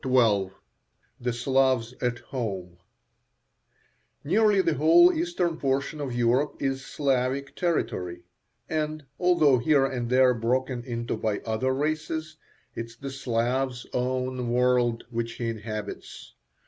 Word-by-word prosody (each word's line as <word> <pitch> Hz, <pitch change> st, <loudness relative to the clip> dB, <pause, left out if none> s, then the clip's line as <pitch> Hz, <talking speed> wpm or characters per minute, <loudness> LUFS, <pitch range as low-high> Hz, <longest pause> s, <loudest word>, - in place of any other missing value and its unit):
XII 115 Hz, -8 st, +3 dB, 0.7 s
THE 125 Hz, 0 st, -1 dB
SLAVS 130 Hz, -1 st, +1 dB
AT 125 Hz, -1 st, 0 dB
HOME 95 Hz, -9 st, -4 dB, 1.5 s
Nearly 205 Hz, +5 st, +3 dB
the 165 Hz, -, +2 dB
whole 165 Hz, -, +6 dB
eastern 320 Hz, -, -1 dB
portion 140 Hz, +2 st, -1 dB
of 140 Hz, -3 st, -3 dB
Europe 120 Hz, +4 st, +2 dB
is 135 Hz, -1 st, -1 dB
Slavic 135 Hz, -1 st, -1 dB
territory, 105 Hz, -, -2 dB, 0.4 s
and 155 Hz, -1 st, -2 dB
although 160 Hz, -8 st, +4 dB
here 140 Hz, +2 st, +3 dB
and 125 Hz, -3 st, -3 dB
there 130 Hz, 0 st, +5 dB
broken 125 Hz, +2 st, -1 dB
into 120 Hz, -1 st, -3 dB
by 105 Hz, -2 st, -1 dB
other 115 Hz, +4 st, -1 dB
races, 155 Hz, +2 st, -2 dB, 0.4 s
it 115 Hz, -, -5 dB
is 115 Hz, -, -16 dB
the 135 Hz, +1 st, -6 dB
Slav's 125 Hz, 0 st, -1 dB
own 125 Hz, 0 st, -1 dB
world 125 Hz, -1 st, +2 dB
which 115 Hz, 0 st, -3 dB
he 115 Hz, -1 st, -3 dB
inhabits. 110 Hz, -2 st, -7 dB
130 Hz, 120 wpm, -26 LUFS, 120-145 Hz, 1.5 s, whole